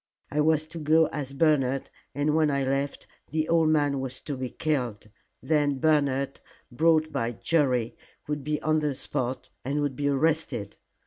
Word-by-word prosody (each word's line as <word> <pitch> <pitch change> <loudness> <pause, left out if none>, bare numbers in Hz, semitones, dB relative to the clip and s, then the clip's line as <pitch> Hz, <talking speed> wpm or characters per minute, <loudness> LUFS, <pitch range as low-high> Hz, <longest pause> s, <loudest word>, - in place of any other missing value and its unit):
I 150 - +1
was 155 0 +3
to 165 +1 -9
go 160 +1 +4
as 140 -3 -4
Bernard, 135 -3 +1 0.2
and 145 +1 +1
when 155 -1 +3
I 140 -1 +1
left, 135 +1 -1 0.2
the 155 0 -1
old 165 -1 +3
man 145 -3 +2
was 130 -1 -5
to 145 - -4
be 130 -1 -4
killed. 120 -10 -2 0.3
Then 145 -3 +2
Bernard, 140 -2 +1 0.3
brought 155 +3 +3
by 120 -4 -1
Jerry, 130 -5 +1 0.3
would 150 -1 -3
be 150 +1 -1
on 155 0 +2
the 150 -3 -1
spot 130 0 -4
and 140 +3 -1
would 145 -2 -1
be 145 +2 -1
arrested." 140 -7 0
145 Hz, 170 wpm, -27 LUFS, 135-155 Hz, 0.3 s, go